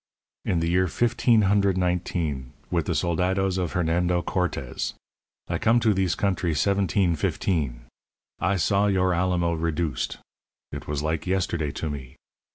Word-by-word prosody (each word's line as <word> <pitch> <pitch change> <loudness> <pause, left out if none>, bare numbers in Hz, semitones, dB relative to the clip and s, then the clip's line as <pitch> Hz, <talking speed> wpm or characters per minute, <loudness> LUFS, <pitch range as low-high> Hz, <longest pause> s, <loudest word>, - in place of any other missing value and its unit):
In 85 - +1
the 85 - 0
year 90 +2 +2
fifteen 120 +3 +3
hundred 100 -1 +3
nineteen, 85 -7 -1 0.2
with - - 0
the - - +1
soldados 95 +2 +1
of 90 -3 -2
Hernando 85 +1 +1
Cortez. 90 -2 -2 0.5
I - - -2
come 115 +2 +4
to 110 -3 +3
thees 95 -3 +1
country 90 -5 0
seventeen 95 -1 +2
fifteen. 70 -6 -1 0.6
I 100 +3 +1
saw 100 +3 +2
your 95 -2 +2
Alamo 85 -1 +1
reduced. 80 -3 -2 0.5
It 70 +1 -7
was 75 0 -2
like 80 +3 -2
yesterday 85 -5 0
to 80 - -3
me. 65 -3 -8
90 Hz, 145 wpm, -25 LUFS, 80-95 Hz, 0.6 s, come